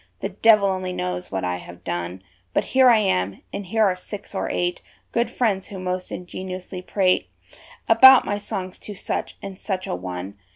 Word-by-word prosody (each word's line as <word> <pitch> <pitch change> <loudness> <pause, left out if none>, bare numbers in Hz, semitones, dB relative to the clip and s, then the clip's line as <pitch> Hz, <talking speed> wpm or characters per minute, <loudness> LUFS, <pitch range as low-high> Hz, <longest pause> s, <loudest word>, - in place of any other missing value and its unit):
The - - -2
devil 215 -3 +5
only 185 -1 -2
knows 90 - -4
what 95 -1 -2
I 90 0 -1
have 85 0 -12
done, 85 +2 -4 0.3
But - - +3
here 260 -1 +7
I 235 - +7
am, 100 - 0
and 200 - -5
here 220 +3 +2
are 190 -2 +2
six 200 +3 -9
or 195 - -2
eight 175 0 -1 0.3
Good 235 0 +1
friends, 205 -6 0
who 200 - -8
most 185 0 -3
ingenuously 185 0 -6
prate 185 0 +1 0.6
About 260 +4 +8
my 205 - -1
songs 185 -2 -5
to 210 - -9
such 195 - -4
and 195 -1 -7
such 190 -2 -3
a - - -3
one. 90 +2 -6
185 Hz, 190 wpm, -23 LUFS, -, 0.6 s, About